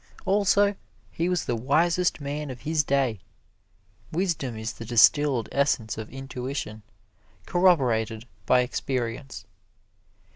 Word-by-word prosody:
Also, 200 Hz, +1 st, +3 dB, 0.4 s
he 170 Hz, +2 st, -1 dB
was 180 Hz, -3 st, 0 dB
the 120 Hz, -, -1 dB
wisest 165 Hz, +10 st, +1 dB
man 145 Hz, +1 st, -4 dB
of 125 Hz, -2 st, -8 dB
his 155 Hz, 0 st, +1 dB
day. 135 Hz, -7 st, 0 dB, 0.9 s
Wisdom 155 Hz, -, -1 dB
is 110 Hz, +1 st, -4 dB
the -, -, -9 dB
distilled 120 Hz, +2 st, +4 dB
essence 140 Hz, -6 st, 0 dB
of 110 Hz, -1 st, -7 dB
intuition, 130 Hz, -4 st, -6 dB, 0.6 s
corroborated 120 Hz, -11 st, +2 dB, 0.2 s
by 125 Hz, -, +5 dB
experience. 125 Hz, 0 st, -4 dB
135 Hz, 110 wpm, -26 LUFS, 120-160 Hz, 0.9 s, by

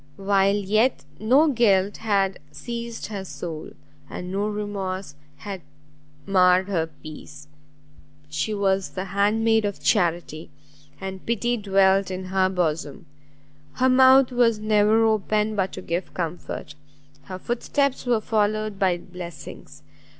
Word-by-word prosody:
while 195 Hz, 0 st, +2 dB
yet 215 Hz, -, +1 dB
no 260 Hz, +9 st, +4 dB
guilt 205 Hz, -7 st, +2 dB
had 195 Hz, -3 st, 0 dB
seized 235 Hz, -, -6 dB
her 200 Hz, -3 st, -5 dB
soul, 165 Hz, -4 st, -7 dB, 0.4 s
and 180 Hz, 0 st, -6 dB
no 200 Hz, +2 st, -1 dB
remorse 200 Hz, -5 st, -4 dB, 0.2 s
had 190 Hz, +4 st, -7 dB, 0.6 s
marred 185 Hz, -1 st, +4 dB
her 170 Hz, -5 st, 0 dB, 0.2 s
peace. 150 Hz, -1 st, -11 dB, 0.8 s
She 150 Hz, +8 st, -2 dB
was 195 Hz, -2 st, 0 dB
the 185 Hz, 0 st, -5 dB
hand 200 Hz, +3 st, +1 dB
maid 225 Hz, -1 st, +3 dB
of 200 Hz, -1 st, -3 dB
charity, 170 Hz, -5 st, 0 dB, 0.5 s
and 190 Hz, -1 st, -6 dB
pity 235 Hz, +1 st, 0 dB
dwelt 195 Hz, -2 st, +3 dB
in 185 Hz, 0 st, -5 dB
her 190 Hz, -1 st, +3 dB
bosom! 165 Hz, -5 st, -2 dB, 0.7 s
her 260 Hz, +1 st, +2 dB
mouth 260 Hz, 0 st, +6 dB
was 240 Hz, -3 st, +3 dB
never 215 Hz, +1 st, +3 dB
open 215 Hz, 0 st, +1 dB
but 190 Hz, -1 st, 0 dB
to 185 Hz, -, -7 dB
give 170 Hz, +2 st, -4 dB
comfort; 170 Hz, -3 st, -5 dB, 0.5 s
her 185 Hz, -, -6 dB
foot 240 Hz, +5 st, -3 dB
steps 280 Hz, -3 st, 0 dB
were 235 Hz, -3 st, +2 dB
followed 215 Hz, -1 st, 0 dB
by 185 Hz, -3 st, +2 dB
blessings! 175 Hz, -4 st, -10 dB
200 Hz, 130 wpm, -24 LUFS, 185-220 Hz, 0.8 s, mouth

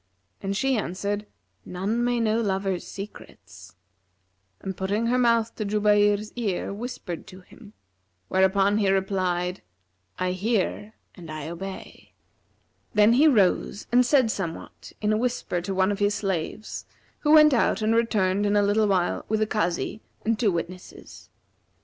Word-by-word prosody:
and 195 Hz, 0 st, -2 dB
she 270 Hz, +4 st, +1 dB
answered, 205 Hz, +1 st, -3 dB, 0.4 s
'None 200 Hz, +6 st, -2 dB
may 245 Hz, 0 st, +1 dB
know 225 Hz, 0 st, +1 dB
lovers' 195 Hz, -3 st, -1 dB
secrets,' 95 Hz, -, -11 dB, 0.8 s
and 190 Hz, -1 st, -5 dB
putting 200 Hz, +5 st, -1 dB
her 245 Hz, +2 st, +2 dB
mouth 230 Hz, -2 st, +2 dB
to 215 Hz, -, -4 dB
Jubayr's 205 Hz, 0 st, +2 dB
ear 205 Hz, -5 st, -2 dB
whispered 205 Hz, -6 st, -6 dB
to 185 Hz, +1 st, -12 dB
him; 210 Hz, +3 st, -16 dB, 0.5 s
where 190 Hz, 0 st, +2 dB
upon 200 Hz, +2 st, +3 dB
he 200 Hz, -2 st, +2 dB
replied, 185 Hz, -2 st, 0 dB, 0.6 s
'I 185 Hz, 0 st, 0 dB
hear 210 Hz, +2 st, -1 dB, 0.2 s
and 170 Hz, -4 st, -12 dB
I 155 Hz, -1 st, -6 dB
obey.' 190 Hz, +3 st, -8 dB, 0.8 s
Then 210 Hz, +2 st, +6 dB
he 290 Hz, +6 st, +5 dB
rose 205 Hz, -5 st, +2 dB
and 245 Hz, +1 st, +5 dB
said 250 Hz, -3 st, +3 dB
somewhat 170 Hz, -6 st, -6 dB
in 210 Hz, 0 st, +2 dB
a -, -, +2 dB
whisper 235 Hz, -7 st, -1 dB
to 190 Hz, +2 st, -4 dB
one 190 Hz, +1 st, +2 dB
of 200 Hz, -, -3 dB
his 205 Hz, 0 st, +2 dB
slaves, 195 Hz, +1 st, -4 dB, 0.3 s
who 300 Hz, 0 st, +3 dB
went 305 Hz, -2 st, +8 dB
out 225 Hz, -3 st, +2 dB
and 220 Hz, +1 st, +2 dB
returned 205 Hz, -4 st, +1 dB
in 205 Hz, -, +1 dB
a 205 Hz, -, +4 dB
little 210 Hz, +1 st, +2 dB
while 185 Hz, -3 st, 0 dB
with 220 Hz, 0 st, +1 dB
a 215 Hz, -, +2 dB
Kazi 210 Hz, 0 st, -2 dB, 0.2 s
and 225 Hz, 0 st, +1 dB
two 220 Hz, -5 st, +3 dB
witnesses. 175 Hz, +2 st, -7 dB
205 Hz, 155 wpm, -25 LUFS, 185-220 Hz, 0.8 s, went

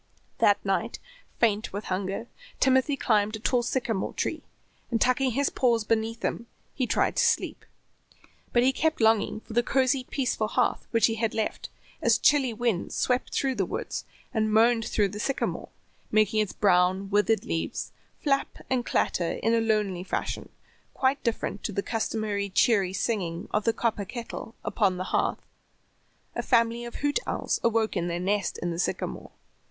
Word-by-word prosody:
That -, -, +5 dB
night, -, -, 0 dB, 0.4 s
faint 220 Hz, -2 st, +2 dB
with 205 Hz, +2 st, -4 dB
hunger, 195 Hz, +3 st, -3 dB, 0.3 s
Timothy 265 Hz, +2 st, +3 dB
climbed 215 Hz, -3 st, +2 dB
a -, -, -6 dB
tall 245 Hz, +3 st, +1 dB
sycamore 235 Hz, -4 st, -2 dB
tree -, -, -2 dB, 0.5 s
and 230 Hz, -, 0 dB
tucking 255 Hz, +2 st, +2 dB
his 280 Hz, +3 st, +1 dB
paws 235 Hz, -3 st, +2 dB
beneath 225 Hz, +1 st, -1 dB
him 235 Hz, -, -2 dB, 0.4 s
tried -, -, +1 dB
to -, -, +4 dB
sleep. -, -, +1 dB, 0.9 s
But 240 Hz, -, +4 dB
he 260 Hz, -, +5 dB
kept 315 Hz, +3 st, 0 dB
longing 220 Hz, -1 st, +2 dB
for 225 Hz, -, -11 dB
the 240 Hz, -, +4 dB
cozy, 260 Hz, +1 st, +1 dB
peaceful 245 Hz, -6 st, -1 dB
hearth 250 Hz, +3 st, 0 dB
which 230 Hz, -3 st, +3 dB
he 225 Hz, -, +2 dB
had 225 Hz, -2 st, 0 dB
left, 220 Hz, -, -2 dB, 0.3 s
as -, -, +4 dB
chilly 280 Hz, -4 st, +4 dB
winds 225 Hz, -5 st, -1 dB
swept 250 Hz, 0 st, 0 dB
through 270 Hz, -1 st, 0 dB
the 205 Hz, -6 st, 0 dB
woods -, -, -4 dB, 0.3 s
and 215 Hz, -2 st, +1 dB
moaned 225 Hz, +1 st, +4 dB
through 205 Hz, -2 st, +1 dB
the 205 Hz, +2 st, -7 dB
sycamore, 275 Hz, +5 st, -2 dB, 0.4 s
making 215 Hz, 0 st, +3 dB
its 210 Hz, -3 st, 0 dB
brown, 185 Hz, 0 st, +2 dB
withered 210 Hz, +2 st, +2 dB
leaves 165 Hz, -, -3 dB, 0.3 s
flap 275 Hz, -2 st, 0 dB
and 255 Hz, -2 st, +2 dB
clatter 170 Hz, -2 st, +1 dB
in 225 Hz, +2 st, 0 dB
a 230 Hz, -, +3 dB
lonely 210 Hz, -5 st, 0 dB
fashion, -, -, -3 dB, 0.5 s
quite 270 Hz, +1 st, +1 dB
different 225 Hz, -3 st, -2 dB
to -, -, -1 dB
the 200 Hz, 0 st, -2 dB
customary 215 Hz, -3 st, -2 dB
cheery 195 Hz, -1 st, +3 dB
singing 185 Hz, -5 st, -2 dB
of 210 Hz, 0 st, 0 dB
the 230 Hz, -, +4 dB
copper 220 Hz, -4 st, -1 dB
kettle 230 Hz, +1 st, -7 dB
upon 195 Hz, -5 st, +1 dB
the 185 Hz, -, -2 dB
hearth. -, -, 0 dB, 0.9 s
A -, -, -2 dB
family 235 Hz, -1 st, +2 dB
of 235 Hz, -, -8 dB
hoot 290 Hz, 0 st, 0 dB
owls -, -, -1 dB
awoke 225 Hz, -2 st, +1 dB
in 175 Hz, -2 st, 0 dB
their 170 Hz, 0 st, -2 dB
nest 200 Hz, +1 st, 0 dB
in 175 Hz, -, -1 dB
the 165 Hz, -, -4 dB
sycamore. -, -, -2 dB
225 Hz, 170 wpm, -27 LUFS, 205-240 Hz, 0.9 s, That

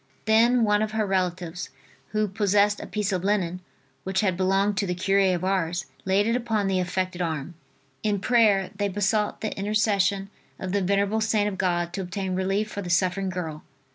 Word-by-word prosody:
Then 230 Hz, +3 st, +4 dB
one 210 Hz, -1 st, +3 dB
of 215 Hz, 0 st, -2 dB
her 220 Hz, -1 st, +1 dB
relatives 180 Hz, -2 st, -2 dB, 0.4 s
who 215 Hz, 0 st, 0 dB
possessed 205 Hz, +1 st, +2 dB
a -, -, -7 dB
piece 210 Hz, -1 st, -1 dB
of 185 Hz, -2 st, -1 dB
linen, 185 Hz, -3 st, 0 dB, 0.4 s
which 190 Hz, +2 st, 0 dB
had 190 Hz, -4 st, +1 dB
belonged 195 Hz, +2 st, +1 dB
to 200 Hz, 0 st, 0 dB
the 180 Hz, -, -1 dB
cure 195 Hz, +2 st, +2 dB, 0.2 s
of 175 Hz, -, -4 dB
Ars, 185 Hz, -2 st, 0 dB, 0.2 s
laid 195 Hz, +2 st, +2 dB
it 230 Hz, +1 st, +1 dB
upon 225 Hz, -4 st, 0 dB
the 190 Hz, -1 st, +1 dB
affected 185 Hz, 0 st, -2 dB
arm. 160 Hz, -1 st, -3 dB, 0.5 s
In 210 Hz, -2 st, 0 dB
prayer 210 Hz, -4 st, +3 dB
they 205 Hz, 0 st, 0 dB
besought 205 Hz, +2 st, 0 dB
the 215 Hz, -, -3 dB
intercession 200 Hz, -1 st, +1 dB, 0.3 s
of 185 Hz, -, -5 dB
the 200 Hz, +1 st, +1 dB
venerable 200 Hz, +3 st, +1 dB
servant 215 Hz, -1 st, +2 dB
of 190 Hz, -, -6 dB
God 175 Hz, -2 st, 0 dB
to 195 Hz, -, -3 dB
obtain 190 Hz, +1 st, -3 dB
relief 195 Hz, +3 st, -1 dB
for 205 Hz, -, -4 dB
the 180 Hz, -, -6 dB
suffering 185 Hz, +2 st, +1 dB
girl. 165 Hz, -4 st, -5 dB
195 Hz, 190 wpm, -25 LUFS, 185-210 Hz, 0.5 s, Then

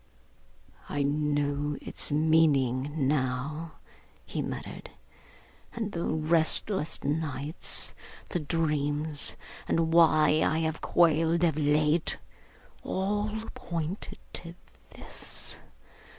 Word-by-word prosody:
'I 145 Hz, -, -1 dB
know 145 Hz, 0 st, 0 dB
its -, -, -1 dB
meaning 145 Hz, -3 st, +2 dB
now,' 145 Hz, +3 st, -2 dB, 0.5 s
he -, -, -4 dB
muttered, -, -, -6 dB, 0.9 s
'and 220 Hz, -3 st, -3 dB
the 170 Hz, -2 st, -3 dB
restless 160 Hz, +2 st, +3 dB
nights, 150 Hz, 0 st, -1 dB, 0.4 s
the 175 Hz, -, -1 dB
dreams, 150 Hz, -1 st, +1 dB, 0.3 s
and 165 Hz, 0 st, +1 dB
why 155 Hz, -2 st, +5 dB
I 155 Hz, -, +1 dB
have 160 Hz, 0 st, -2 dB
quailed 165 Hz, 0 st, +3 dB
of 165 Hz, -4 st, +3 dB
late. 150 Hz, +2 st, +2 dB, 0.6 s
All 205 Hz, +3 st, -1 dB, 0.2 s
pointed 170 Hz, +3 st, -5 dB, 0.2 s
to 170 Hz, 0 st, -7 dB, 0.4 s
this. -, -, -4 dB
155 Hz, 90 wpm, -28 LUFS, 145-165 Hz, 0.9 s, why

